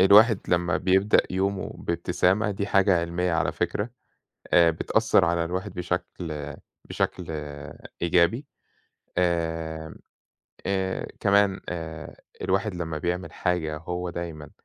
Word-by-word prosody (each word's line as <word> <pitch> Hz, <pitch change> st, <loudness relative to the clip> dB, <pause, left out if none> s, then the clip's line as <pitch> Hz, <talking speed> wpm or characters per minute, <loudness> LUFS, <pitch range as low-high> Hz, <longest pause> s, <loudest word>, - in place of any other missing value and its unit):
الواحد 105 Hz, +3 st, +7 dB
لمّا 85 Hz, -1 st, +2 dB
بيبدأ 95 Hz, +3 st, +4 dB
يومه 95 Hz, +1 st, -1 dB
بابتسامة 105 Hz, +4 st, +1 dB
دي 100 Hz, +1 st, -2 dB
حاجة 95 Hz, -3 st, +4 dB
علّمية 85 Hz, +1 st, -1 dB
على 80 Hz, -3 st, +1 dB
فكرة، 105 Hz, +4 st, -1 dB, 0.6 s
آآ 85 Hz, -1 st, +7 dB
بتأثر 80 Hz, -, +3 dB
على 85 Hz, 0 st, +1 dB
الواحد 90 Hz, +3 st, -3 dB
بشكل 85 Hz, -5 st, -4 dB, 0.3 s
بشكل 90 Hz, -, -2 dB, 0.8 s
إيجابي. 85 Hz, -, +3 dB, 0.7 s
آمم، 80 Hz, -3 st, -1 dB, 0.7 s
آآ، 95 Hz, -1 st, -1 dB
كمان 100 Hz, -1 st, +3 dB
آآ 80 Hz, -2 st, -6 dB, 0.3 s
الواحد 95 Hz, +2 st, 0 dB
لمّا 80 Hz, -3 st, -3 dB
بيعمل 90 Hz, +3 st, -2 dB
حاجة 85 Hz, -4 st, -1 dB
هو 90 Hz, +2 st, -4 dB
دايمًا 80 Hz, -4 st, -6 dB
90 Hz, 110 wpm, -26 LUFS, 85-95 Hz, 0.8 s, الواحد